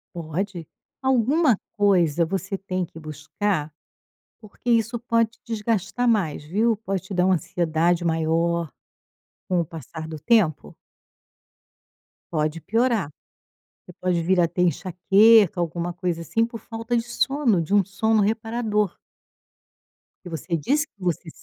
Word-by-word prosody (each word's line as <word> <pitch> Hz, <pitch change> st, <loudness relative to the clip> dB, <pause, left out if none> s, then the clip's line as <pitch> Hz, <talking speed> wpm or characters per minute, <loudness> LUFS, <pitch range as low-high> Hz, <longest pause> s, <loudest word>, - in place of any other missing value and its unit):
Pode. 170 Hz, +1 st, -4 dB, 0.3 s
Alguma 265 Hz, -, +3 dB, 0.2 s
coisa 175 Hz, -6 st, +3 dB
você 195 Hz, +3 st, -3 dB
tem 185 Hz, -1 st, -3 dB
que 165 Hz, -, -13 dB
buscar, 155 Hz, +2 st, -3 dB, 0.7 s
porque 215 Hz, +3 st, -8 dB
isso 230 Hz, 0 st, +2 dB
pode 230 Hz, -1 st, +1 dB
desgastar 225 Hz, -1 st, -1 dB
mais, 190 Hz, -11 st, +1 dB
viu, 215 Hz, +9 st, +1 dB
pode 195 Hz, -3 st, -4 dB
te 190 Hz, -, -8 dB
dar 180 Hz, -1 st, +2 dB
uma 190 Hz, 0 st, +4 dB
ansiedade 170 Hz, +1 st, 0 dB
maior. 165 Hz, 0 st, 0 dB, 0.8 s
Com 180 Hz, -1 st, +2 dB
o -, -, -3 dB
passar 160 Hz, 0 st, -8 dB
do 160 Hz, -1 st, -6 dB
tempo 155 Hz, -, +2 dB, 1.6 s
pode 155 Hz, 0 st, -1 dB
piorar. 225 Hz, -, +1 dB, 0.8 s
Você 180 Hz, -, -13 dB
pode 180 Hz, -2 st, +1 dB
vir 180 Hz, +2 st, +2 dB
a 170 Hz, -, +4 dB
ter 180 Hz, -, -1 dB
enxaqueca, 195 Hz, +3 st, +4 dB
alguma 170 Hz, +1 st, -2 dB
coisa 175 Hz, -1 st, -3 dB
assim, 225 Hz, +7 st, 0 dB
por 230 Hz, -1 st, -9 dB
falta 230 Hz, +2 st, -3 dB
de 230 Hz, -, +1 dB
sono, 240 Hz, -3 st, +1 dB
de 185 Hz, +5 st, -2 dB
um 200 Hz, -1 st, +5 dB
sono 220 Hz, +3 st, +1 dB
reparador. 220 Hz, -1 st, -1 dB, 1.3 s
Porque 170 Hz, -3 st, -5 dB
você 170 Hz, +4 st, -3 dB
disse 290 Hz, -, 0 dB
que -, -, -67 dB
você 175 Hz, -1 st, -2 dB
190 Hz, 135 wpm, -24 LUFS, 170-225 Hz, 1.6 s, um